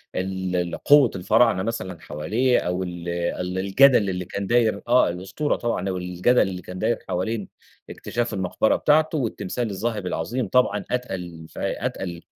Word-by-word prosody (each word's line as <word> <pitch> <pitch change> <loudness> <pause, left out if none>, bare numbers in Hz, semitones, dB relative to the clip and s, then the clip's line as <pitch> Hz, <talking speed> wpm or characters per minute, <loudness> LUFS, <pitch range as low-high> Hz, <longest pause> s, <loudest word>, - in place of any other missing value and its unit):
ال 95 0 -2
القوة 120 +9 +4
الفراعنة 105 +1 +3
مثلًا 95 -6 -4
حواليه 110 +13 0
أو 90 +1 -2
ال 85 -1 -6
ال 85 +1 -2
الجدل 100 +2 +5
اللي 90 -1 -3
كان 100 +2 -4
داير 115 -3 +2
آه، 125 -4 +4
الأسطورة 95 - -2
طبعًا 115 -5 -2
أو 95 - -2
الجدل 90 +7 +2
اللي 90 -2 -2
كان 90 0 -8
داير - - 0
حوالين 105 +3 -2 0.4
اكتشاف 120 -1 -3
المقبرة 95 +2 +1
بتاعته، 155 +1 +2
والتمثال 120 -2 -2
الذهبي 105 0 -3
العظيم 115 +10 -2
طبعًا 105 -3 +2
أتقل 90 -9 -4
ف - - -17
أتقل 85 -3 -3
95 Hz, 150 wpm, -24 LUFS, 90-120 Hz, 0.4 s, الجدل